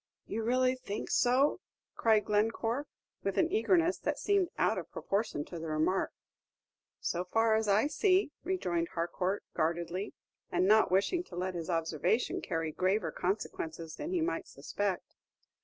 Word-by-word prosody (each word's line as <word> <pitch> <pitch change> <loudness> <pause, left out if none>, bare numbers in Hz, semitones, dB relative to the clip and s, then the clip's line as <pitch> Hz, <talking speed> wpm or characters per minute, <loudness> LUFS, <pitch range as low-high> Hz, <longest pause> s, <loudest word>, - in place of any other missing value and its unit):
"You 225 - -3
really 255 +3 +3
think 235 -5 -5
so?" 260 +7 +3 0.4
cried 220 -2 +3
Glencore, 225 +6 0 0.3
with - - -2
an 335 0 +3
eagerness 360 -4 +3
that - - -1
seemed 400 -4 +2
out - - +2
of - - -8
proportion 195 -7 -2
to 170 - -7
the 165 - -5
remark. 155 +5 +1 0.9
"So 175 +1 -1
far 225 +4 +2
as 220 0 +2
I 205 +4 +4
see," 370 +2 +2
rejoined 180 - -1
Harcourt, 180 +3 -1
guardedly, 170 +4 -1 0.4
and 180 +1 +2
not 215 +2 +5
wishing 200 - +2
to 175 - -11
let 185 +1 -2
his 170 -1 -5
observation 165 - 0
carry 165 -1 -2
graver 190 +6 +1
consequences 165 -4 -3
than 300 - -4
he 360 -2 0
might 335 +2 -1
suspect. 200 -3 -3
205 Hz, 150 wpm, -32 LUFS, 175-255 Hz, 0.9 s, not